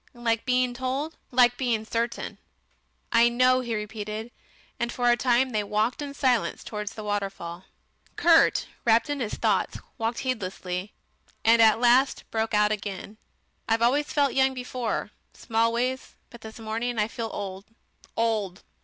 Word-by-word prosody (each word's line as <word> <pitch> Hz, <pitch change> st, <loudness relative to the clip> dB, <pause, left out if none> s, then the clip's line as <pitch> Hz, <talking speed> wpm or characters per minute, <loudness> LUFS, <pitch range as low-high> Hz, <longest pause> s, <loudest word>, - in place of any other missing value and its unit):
"Like 230 Hz, -2 st, -1 dB
being 250 Hz, -1 st, +2 dB
told?" 265 Hz, +5 st, -3 dB
"Like 245 Hz, -1 st, +4 dB
being 235 Hz, -4 st, 0 dB
certain. 230 Hz, +1 st, -3 dB, 0.7 s
"I 235 Hz, 0 st, +5 dB
know," 255 Hz, +1 st, +4 dB
he 240 Hz, -3 st, -3 dB
repeated, 215 Hz, +1 st, -5 dB, 0.5 s
and 235 Hz, 0 st, -1 dB
for 245 Hz, 0 st, +2 dB
a -, -, +5 dB
time 250 Hz, +1 st, +2 dB
they 215 Hz, -2 st, 0 dB
walked 215 Hz, +6 st, 0 dB
in 285 Hz, -1 st, -6 dB
silence 255 Hz, -5 st, +1 dB
towards 210 Hz, 0 st, -5 dB
the 215 Hz, -, -7 dB
waterfall. 195 Hz, -4 st, -4 dB, 0.5 s
Kurt, 335 Hz, -1 st, +4 dB, 0.2 s
wrapped 230 Hz, +4 st, +3 dB
in 290 Hz, -, -2 dB
his 225 Hz, -5 st, -2 dB
thoughts, -, -, 0 dB, 0.2 s
walked 225 Hz, +1 st, -1 dB
heedlessly, 190 Hz, -6 st, -3 dB, 0.5 s
and 230 Hz, +1 st, +6 dB
at 220 Hz, 0 st, +6 dB
last 250 Hz, +3 st, +4 dB
broke 220 Hz, -1 st, 0 dB
out 210 Hz, 0 st, +4 dB
again. 205 Hz, 0 st, -5 dB, 0.5 s
"I've 225 Hz, +1 st, +2 dB
always 285 Hz, +5 st, +2 dB
felt 285 Hz, -2 st, +2 dB
young 265 Hz, 0 st, +3 dB
before, 250 Hz, -4 st, -3 dB, 0.2 s
Smallways, 235 Hz, +3 st, -1 dB, 0.2 s
but 235 Hz, -, -12 dB
this 220 Hz, 0 st, -10 dB
morning 225 Hz, +2 st, -3 dB
I 210 Hz, 0 st, +2 dB
feel 225 Hz, 0 st, -5 dB
old 195 Hz, -1 st, -6 dB, 0.5 s
old. 215 Hz, -5 st, -1 dB
230 Hz, 150 wpm, -26 LUFS, 215-250 Hz, 0.7 s, and